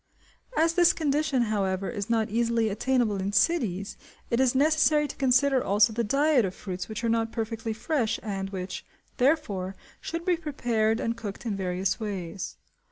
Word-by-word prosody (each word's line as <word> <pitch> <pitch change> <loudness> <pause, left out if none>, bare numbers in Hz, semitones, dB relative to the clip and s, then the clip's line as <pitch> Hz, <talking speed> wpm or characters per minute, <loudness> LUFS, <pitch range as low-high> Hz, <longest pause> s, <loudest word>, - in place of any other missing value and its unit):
As 330 +1 +3
this 345 -1 +5
condition, 290 -4 +1
however, 195 -3 -1
is 205 -3 -4
not 225 -2 +1
easily 230 0 +1
attainable 230 0 +1
in 195 +1 -2
cities, 200 - +1 0.3
it 235 - +2
is 260 -1 +3
necessary 300 +1 +3
to - - -8
consider 265 0 +3
also 205 +2 +3
the 235 +2 0
diet 275 +3 +3
of 190 -1 -3
fruits 185 -1 -6
which 220 +2 -5
are - - +1
not 225 0 +1
perfectly 225 0 -3
fresh 235 +1 -1
and 195 -2 -3
which, 185 -1 -5 0.3
therefore, 230 - +1 0.2
should 335 +1 -5
be 360 -2 +2
prepared 235 -8 0
and 230 0 -2
cooked 210 -1 -7
in 215 -3 -1
various 185 0 -1
ways. 195 -4 -5
225 Hz, 165 wpm, -27 LUFS, 200-270 Hz, 0.3 s, this